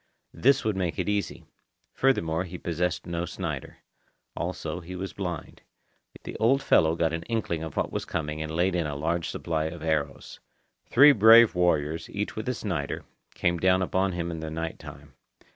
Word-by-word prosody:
This 135 +2 +3
would 110 -2 +1
make 90 -3 -2
it 90 - -2
easy. 105 -1 -2 0.5
Furthermore, 85 -11 +1
he 90 0 -7
possessed 85 0 -2
no 85 0 -3
Snider. - - -5 0.6
Also, - - -4
he 90 +1 -9
was 95 +1 -5
blind. 90 -5 -6 0.6
The - - -7
old 135 +5 +3
fellow 80 0 +4
got 80 -1 0
an 80 - -2
inkling 110 -8 -1
of 80 -2 -7
what - - 0
was - - -3
coming 75 -1 -4
and 80 - -4
laid 90 +3 +1
in 85 -3 0
a 75 - -4
large 85 +4 -1
supply 80 -2 -2
of 80 0 -6
arrows. 75 -4 -2 0.5
Three 145 +4 +8
brave 115 -1 +7
warriors, 80 -3 0
each 105 +1 -4
with 110 +3 -4
a 125 - -1
Snider, 85 -11 -3 0.3
came 85 0 0
down 95 +1 +3
upon 95 +1 0
him 85 -1 -3
in 80 - -5
the 80 0 -5
night 80 +1 -4
time. 70 0 -12
85 Hz, 180 wpm, -27 LUFS, 80-95 Hz, 0.6 s, Three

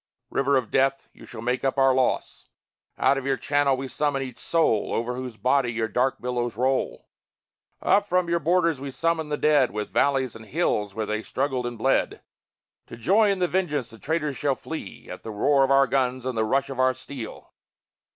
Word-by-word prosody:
River 140 0 +2
of 125 -4 -2
death, 135 +1 +1
you - - -15
shall 110 -2 -9
make 125 +1 -1
up 135 +1 0
our 135 -1 +5
loss! 130 -1 -1 0.5
Out 140 - +3
of 135 - -9
your 135 -1 +1
channel 145 -2 +1
we 135 +1 -4
summon 140 0 -1
each 130 -3 -8
soul, 160 -11 +1
Over 120 +2 -1
whose 125 -2 -6
body 125 +2 +2
your 115 -1 -1
dark 125 +4 0
billows 120 -3 -2
roll; 130 +2 -1 0.8
Up 205 0 +3
from 180 -2 +1
your 170 0 +1
borders 165 -2 +1
we 140 - -4
summon 160 +2 -1
the 150 - -1
dead, 145 -4 +3
From 105 0 -3
valleys 135 -3 +1
and 110 -1 -11
hills 105 - -1
where 110 - -2
they 110 +1 -2
struggled 130 0 -2
and 120 -1 -6
bled, 135 +5 0 0.6
To - - -10
joy 200 - +3
in 200 - +1
the 180 -1 +1
vengeance 150 -10 -1
the 115 - -13
traitors 150 -2 -1
shall 145 -3 +1
feel 130 -7 -8
At - - -10
the - - -8
roar 135 +6 +3
of 135 - +1
our 135 0 +5
guns 130 -1 0
and 130 -2 -2
the 110 0 +1
rush 135 +4 0
of 130 - -6
our 130 0 +3
steel! 130 -3 -9
135 Hz, 205 wpm, -25 LUFS, 120-145 Hz, 0.8 s, our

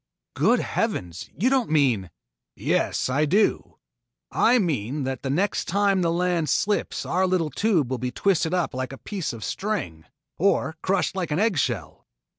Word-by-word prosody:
"Good - - +3
heavens, 85 -1 -3
you 245 +9 +2
don't 260 -4 +2
mean 130 - +2 0.3
" - - -62
"Yes, - - 0
I 140 +4 +1
do. 200 +8 +1 0.5
I 245 +2 +4
mean 145 - -1
that 130 -1 -3
the 135 - -3
next 185 +9 0
time 200 +1 +2
the 170 -1 +1
land 175 -2 0
slips 205 0 0
our 185 +2 +1
little 175 -4 0
tube 170 - +1
will 130 - -1
be 125 +1 -2
twisted 170 +2 +1
up 180 -1 0
like 130 0 -3
a - - -8
piece 195 0 -4
of 115 -3 -8
string, 90 - -3 0.3
or 175 -3 +2
crushed 190 0 0
like 180 -5 -2
an 150 - 0
eggshell. 200 -7 -1
165 Hz, 170 wpm, -24 LUFS, 130-195 Hz, 0.5 s, I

